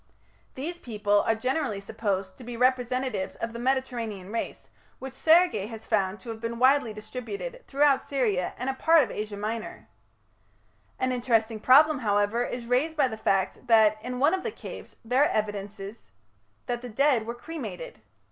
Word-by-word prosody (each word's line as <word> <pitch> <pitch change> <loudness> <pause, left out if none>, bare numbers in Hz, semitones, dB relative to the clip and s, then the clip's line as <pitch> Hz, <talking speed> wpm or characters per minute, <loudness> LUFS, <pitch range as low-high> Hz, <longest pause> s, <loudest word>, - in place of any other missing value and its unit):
These 335 +6 -5
people 210 -5 +1
are 225 - +3
generally 255 -2 -1
supposed 195 -2 -3
to - - -10
be 240 0 -7
representatives 250 -4 0
of 230 0 -5
the 235 - -6
Mediterranean 240 -7 -2
race, 230 - -4 0.3
which 265 0 -8
Sergi 320 - +4
has 225 -1 -9
found 195 -1 0
to 230 - -10
have 220 -1 -6
been 230 0 -3
widely 260 -1 +4
distributed 400 - -7
throughout 280 -1 +3
Syria 220 -10 -1
and 250 - -4
a 270 - +1
part 320 +3 +5
of - - -5
Asia 210 -1 -5
Minor. 215 +2 -5 1.1
An 255 0 0
interesting 230 -3 +1
problem, 285 +5 +6
however, 205 +1 +1
is 245 -1 -5
raised 270 +7 +1
by 280 - +4
the 220 - -5
fact 195 +3 -1
that, 215 -2 +5
in 250 +2 -5
one 295 +6 +4
of 380 - 0
the 455 - -3
caves, - - -10
there 250 +4 +2
are 295 - +6
evidences 205 - -4 0.6
that 240 -1 -3
the 245 - -7
dead 245 -1 +2
were 235 - -4
cremated. 330 - -7
240 Hz, 170 wpm, -27 LUFS, 215-265 Hz, 1.1 s, problem